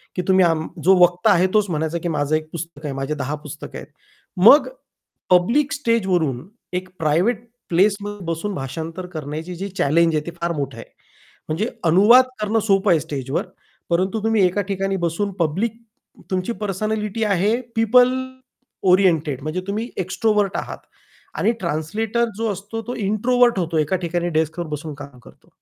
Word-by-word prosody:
की 180 - 0
तुम्ही 190 -1 +5
आम 160 -1 0 0.2
जो 190 +2 +6
वक्ता 180 +4 +4
आहे 185 0 +4
तोच 210 -2 +2
म्हणायचा 160 0 -1
की 170 - -4
माझं 150 -1 0
एक 155 0 -3
पुस्तक 165 -2 -7
आहे, 140 - -3
माझे 135 +2 -3
10 140 +1 -3
पुस्तकं 150 - -8
आहेत. - - -9 0.5
मग 230 +11 +7 0.6
पब्लिक 235 +12 +3
स्टेजवरून 185 - 0 0.3
एक 185 0 -6
प्रायव्हेट 185 +10 +1 0.2
प्लेसमध्ये 200 +2 +1
बसून 165 +5 -3
भाषांतर 160 +7 -5
करण्याची 155 +3 -5
जी 195 +3 -5
चॅलेंज 165 +2 +3
आहे, 150 - -1
ते 170 - -5
फार 170 0 0
मोठं 135 -4 -4
आहे. 115 - -9 0.6
म्हणजे 180 +9 -1 0.2
अनुवाद 215 +10 +7 0.2
करणं 215 +2 +1
सोपं 195 0 +3
आहे 165 - +4
स्टेजवर, 140 0 -3 0.4
परंतु 190 +5 0
तुम्ही 220 -4 +3
एका 185 +3 +1
ठिकाणी 195 0 -1
बसून 200 +5 -2
पब्लिक 190 +8 0 0.6
तुमची 185 +4 -1
पर्सनॅलिटी 210 +2 -2
आहे 205 +1 +2 0.2
पिपल 245 +3 +5 0.8
ओरिएंटेड 160 -8 +2
म्हणजे 155 +4 -3
तुम्ही 215 +4 -3 0.2
एक्स्ट्रोव्हर्ट 205 0 +1
आहात - - -5 0.6
आणि 230 - +3
ट्रान्सलेटर 210 +9 -1
जो 225 -2 -1
असतो 205 +4 -6
तो 245 - -3
इंट्रोव्हर्ट 235 +2 +2
होतो 165 -1 -1
एका 155 +4 +1
ठिकाणी 175 0 -1
डेस्कवर 160 +1 -1
बसून 150 0 -5
काम 140 -2 -11
करतो. - - -19
180 Hz, 155 wpm, -21 LUFS, 160-210 Hz, 0.8 s, मग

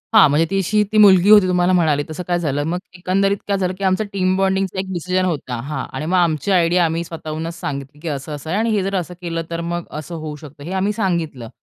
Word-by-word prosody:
हां. 200 -8 +8
म्हणजे 150 +3 +3
ती 195 - 0
अशी 210 +3 +1
मुलगी 195 -2 +7
होती 210 -3 +8
तुम्हाला 180 0 +2
म्हणाले 155 -5 +2
तसं 160 +3 -5
काय 175 -1 +1
झालं? 145 -3 -1
मग 175 +2 -1 0.2
एकंदरीत 195 +2 +1
काय 200 - +1
झालं 185 -1 -1
की 200 - -6
आमचा 190 +2 +2
टीम 185 -1 +1
बॉन्डिंगचा 190 -1 0
एक 190 - -2
डिसिजन 185 +2 0
होता. 145 -8 -2
हां 140 0 -4
आणि 150 - -3
मग 180 +3 +1
आमची 170 +2 +1
आयडिया 175 -1 +3
आम्ही 165 +1 -1
स्वतःहूनच 160 0 -5
सांगितली, 140 +1 -5
की 170 - -8
असं-असं 145 +1 -5
आहे 190 - 0
आणि 230 +1 +1
हे 210 -3 +1
जर 195 +1 -2
असं 180 +1 -6
केलं. 165 -1 -3
तर 170 0 -3
मग 175 +1 -3 0.2
असं 170 +3 -7
होऊ 155 -2 -6
शकतं. 145 -1 -12
हे 170 - -6
आम्ही 195 +2 0
सांगितलं. 165 - -2
175 Hz, 235 wpm, -20 LUFS, 155-190 Hz, 0.2 s, हां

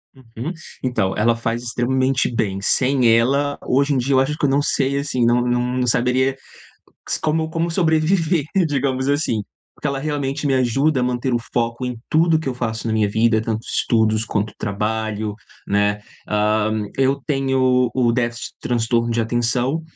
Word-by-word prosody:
Uhum. 125 +3 -7 0.3
Então, 120 -7 0
ela 115 +2 +2
faz 115 +1 -2
extremamente 130 +2 0
bem. 100 -4 -1
Sem 130 +4 +2
ela, 140 +5 +1
hoje 140 +3 +2
em - - +1
dia, 130 +2 0
eu 130 - +5
acho 145 +3 0
que 150 - 0
eu - - +3
não 140 +2 +2
sei, 140 -1 0
assim, 140 -4 0
não 120 +1 +3
não 120 0 +1 0.2
não 125 - 0
saberia 125 +3 +2 0.7
s - - -2
como 160 +1 0
como 165 +1 -1
sobreviver, 165 -1 +1 0.2
digamos 135 -2 -1
assim. 140 -7 0 0.3
Porque - - -4
ela 140 -1 -2
realmente 145 0 -2
me 140 - +2
ajuda 130 +3 +2
a - - +1
manter 125 +1 -1
o 120 - +2
foco 120 +1 -1
em 125 -1 -4
tudo 160 0 +3
que 155 - -3
eu - - -3
faço 115 -2 -3
na 110 - 0
minha 110 -1 +2
vida, 110 +1 +2
tanto 110 -1 -2
estudos 110 -1 +1
quanto 105 0 -2
trabalho, 110 0 -2 0.3
né. 105 +1 +1 0.3
Ah, 105 0 +1 0.3
eu 135 +1 +2
tenho 130 -3 +2
o 125 -3 +2
déficit 120 -1 -2
de - - -61
transtorno 115 0 0
de 115 0 +1
atenção, 120 +6 0
125 Hz, 175 wpm, -20 LUFS, 115-140 Hz, 0.7 s, eu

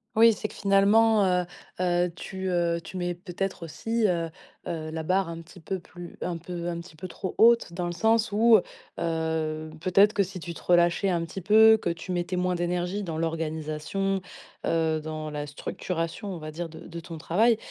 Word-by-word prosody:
Oui, 230 +1 +7
c'est 215 0 -4
que - - -12
finalement, 205 +2 +4
heu 180 -1 +2 0.3
heu, 175 -1 +2
tu, 190 +2 -5
heu, 170 -1 +1
tu 190 - -8
mets 175 -1 -2
peut-être 185 0 -4
aussi, 220 +9 -1
heu 170 -2 0 0.4
heu, 155 -1 -4
la 160 0 -4
barre 185 +1 +1
un 165 0 -6
petit 180 +2 -15
peu 190 +3 -3
plus 175 0 -11
un 175 - -2
peu 175 0 -6
un 170 -1 -3
petit 165 -2 -15
peu 185 +4 -6
trop 185 +1 -5
haute 230 -5 +5
dans 175 +1 -3
le 175 - -2
sens 220 +3 +2
où, 225 0 +6 0.4
heu, 160 -1 -1
peut-être 195 +5 +4
que 205 - +1
si 185 -1 -4
tu 170 +1 -5
te - - -11
relâchais 175 +2 +3
un 170 -2 +1
petit 165 +3 -6
peu, 220 +4 +7
que - - -1
tu 170 +2 -5
mettais 175 +1 -1
moins 180 0 0
d'énergie 175 +3 -1
dans 165 -4 -4
l'organisation, 160 +4 -2 0.4
heu, 160 -1 +1
dans 155 0 -5
la 150 -1 -4
structuration, 165 +6 -4
on 175 - -6
va 155 0 -7
dire, 170 +2 -4
de 160 0 -12
de 170 -1 -6
ton 165 0 -8
travail, 220 +9 +3
175 Hz, 200 wpm, -27 LUFS, 165-195 Hz, 0.4 s, Oui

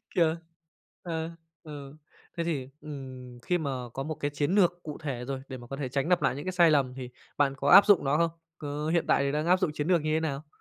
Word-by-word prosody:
Kiểu, 165 -2 +3 0.7
ờ, 165 -1 -3 0.3
ừ, 145 -2 -9 0.4
thế 170 - 0
thì, 140 -6 -3
ừm, 130 -4 -9
khi 180 +6 0
mà 145 -4 -2 0.2
có 135 - -3
một 155 +1 -4
cái 145 0 -3
chiến 145 +6 0
lược 175 -3 +3
cụ 150 -2 -6
thể 135 -6 -5
rồi 135 0 -4
để 130 - -6
mà 120 -1 -12
có 135 - -5
thể 135 -3 -3
tránh 140 +6 -1
lặp 180 -1 +3
lại - - +1
những 145 - -6
cái 185 - -1
sai 170 -3 +5
lầm, 135 -4 +2
thì 125 -1 -7 0.3
bạn 140 -2 +2
có 140 +1 -1
áp 200 +2 +9
dụng 205 -7 +5
nó 140 +2 +2
không? 165 -1 +2 0.3
Có 150 +1 -4
hiện 170 - +2
tại 140 - +3
thì 140 - 0
đang 150 +3 -1
áp 185 +1 +4
dụng 160 - 0
chiến 150 +1 -3
lược 175 -4 +3
như 155 0 -1
thế - - +2
nào? 150 -1 -3
150 Hz, 260 wpm, -28 LUFS, 135-165 Hz, 0.7 s, áp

